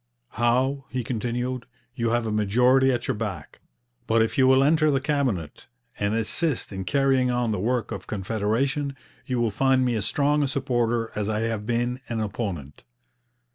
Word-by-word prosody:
'Howe,' 130 +4 +1
he 125 -1 -3
continued, 125 +2 -3 0.3
'you 115 -1 -1
have 120 0 +1
a 110 - -2
majority 125 +6 +3
at 120 -2 -2
your - - +1
back, 100 -8 -5 0.5
but 115 +1 +3
if 110 - -2
you 130 -1 +4
will 130 +1 +5
enter 155 +1 +4
the 140 -2 +2
Cabinet 130 - -2 0.3
and 105 +1 0
assist 115 +2 -1
in 95 -1 -5
carrying 135 +1 +2
on 120 -2 0
the 105 - -1
work 115 +2 -1
of - - -6
Confederation, 115 - -1 0.3
you 125 -2 -1
will 115 -2 +1
find 130 +3 +2
me 125 - +1
as 105 -3 -1
strong 145 +1 +2
a 145 - +2
supporter 120 -4 0
as 105 0 -2
I 110 0 0
have 110 -2 -2
been 120 +1 0
an 115 -1 -2
opponent.' 95 - -4
120 Hz, 175 wpm, -25 LUFS, 110-130 Hz, 0.5 s, will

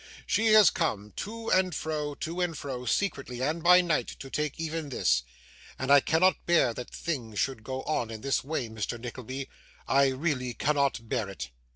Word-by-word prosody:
She 225 - +2
has 215 -6 +8
come 105 - -2
to 225 +2 -5
and 185 -3 +3
fro, 150 -2 -3
to 170 +5 -4
and 170 -3 -1
fro, 130 -3 -5
secretly 135 - -1
and 155 +5 -1
by 180 +2 +7
night, 170 -3 0
to 135 - -10
take 150 -1 -2
even 160 -2 -3
this; 85 - +2 0.6
and 130 +1 -1
I 140 - +9
cannot 165 +6 +2
bear 170 -9 +4
that 125 +1 -7
things 120 -10 -4
should 130 -3 -1
go 130 +2 -4
on 135 -7 -1
in 110 -1 -7
this 140 +2 0
way, 140 -3 -2
Mr 110 +1 -4
Nickleby, 130 +2 -6 0.4
I 140 +1 +4
really 130 -2 -1
cannot 140 -5 0
bear 105 -2 -1
it. 95 -10 -7
140 Hz, 185 wpm, -28 LUFS, 125-165 Hz, 0.6 s, I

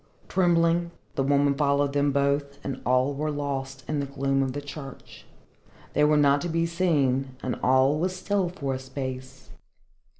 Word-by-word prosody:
Trembling, 170 -2 +2 0.2
the - - -1
woman 140 +1 +3
followed 140 0 +1
them 145 0 +2
both, 140 0 0
and 135 -1 -4
all 130 +3 +3
were 150 +2 -2
lost 135 -2 -4
in 150 -1 -1
the 140 - -2
gloom 135 0 0
of 135 -1 -1
the 145 - -3
church. 140 -1 -10 0.7
They 150 - +3
were 150 0 +4
not 140 -1 +4
to 175 - -3
be 165 0 +1
seen, 140 -7 +1
and 130 - -1
all 130 +3 +3
was 185 +2 -1
still 190 -1 0
for 140 -7 -3
a 130 - -3
space. 130 -1 -7
140 Hz, 170 wpm, -26 LUFS, 135-155 Hz, 0.7 s, were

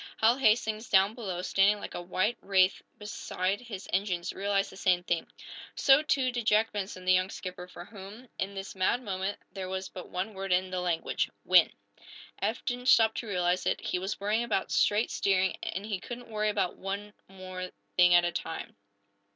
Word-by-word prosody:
Hal 230 +3 +4
Hastings, 220 -2 +2
down 195 +2 +4
below, 190 -7 -4
standing 200 +2 +3
like - - -7
a - - -4
white 185 +6 -1
wraith 190 -1 +3 0.2
beside 200 -1 -3
his 210 -6 -8
engines, 180 -2 -1
realized 200 0 0
the - - -12
same 180 -2 +2
thing. 175 -2 -1 0.5
So, 270 +1 +6
too, 270 -4 +1
did 240 -2 -4
Jack 215 +1 +4
Benson, 190 -2 -5
the 185 - +5
young 185 +1 +2
skipper, 180 -2 -7
for 180 -1 -10
whom, 205 +5 -11
in 195 +1 -3
this 195 0 -6
mad 195 +6 +1
moment, 195 -1 -3
there 190 -2 -6
was 190 0 -4
but 180 - -9
one 190 +4 -3
word 195 0 -5
in 185 +1 +2
the 185 -1 -2
language 175 -2 -1 0.2
"win!" - - +6 0.7
Eph - - -1
didn't 250 0 -3
stop 225 -3 +6
to 235 - -4
realize 180 -2 0
it. - - +1
He 180 - -2
was 190 +3 -4
worrying 210 +3 +1
about 215 -5 -1
straight 210 +3 +2
steering, 190 -1 +1
and 195 +2 -4
he 205 -3 -3
couldn't 240 +3 -8
worry 215 0 0
about 195 -4 -1
more 200 +2 -5
than 195 - -17
one 185 -1 -6 0.2
thing 180 -1 +6
at 175 0 +5
a 175 - 0
time. 165 - -5
195 Hz, 195 wpm, -29 LUFS, 185-215 Hz, 0.7 s, So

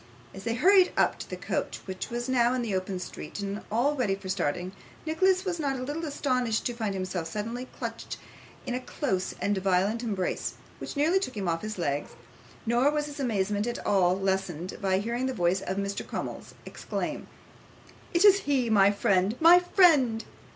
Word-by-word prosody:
As 195 +2 -10
they 230 0 0
hurried 370 - +5
up - - +2
to - - -7
the - - -4
coach, - - -3
which 185 -1 -5
was 240 +1 -3
now 250 -1 +3
in 250 - -1
the 220 -4 -2
open 185 0 -2
street 180 - -7
and 200 +1 -3
all 245 +7 +2
ready 225 -8 +1
for 195 -1 -9
starting, 180 0 -1 0.3
Nicholas 370 +4 +2
was 355 -3 -2
not 275 -3 -1
a 255 - -4
little 295 +5 -4
astonished 255 -6 0
to 245 - -1
find 220 -4 -2
himself 185 -3 -3
suddenly 230 +8 -4
clutched - - -5 0.5
in 250 - -3
a 250 - -1
close 195 -7 -2
and 205 - +1
violent 195 +4 +1
embrace, 200 -6 -2 0.2
which - - -6
nearly 325 +6 +3
took 255 - -5
him 195 -3 -2
off 165 -1 0
his 215 -1 -5
legs; 145 -4 -2 0.5
nor 240 +4 +3
was 300 0 0
his 290 -1 -8
amazement 210 -4 0
at 240 - -2
all 185 -2 +3
lessened 190 -3 -2
by 190 -1 +2
hearing 235 +5 -1
the 260 - -3
voice 180 0 +1
of 190 +1 -3
Mr. 200 0 -2
Crummles - - -6
exclaim, - - -4 0.8
'It 345 +4 +3
is 400 -1 +8
he 265 - 0
my 200 -2 +6
friend, 200 0 +2
my 335 +2 +8
friend! 310 - +4
225 Hz, 190 wpm, -28 LUFS, 190-270 Hz, 0.8 s, is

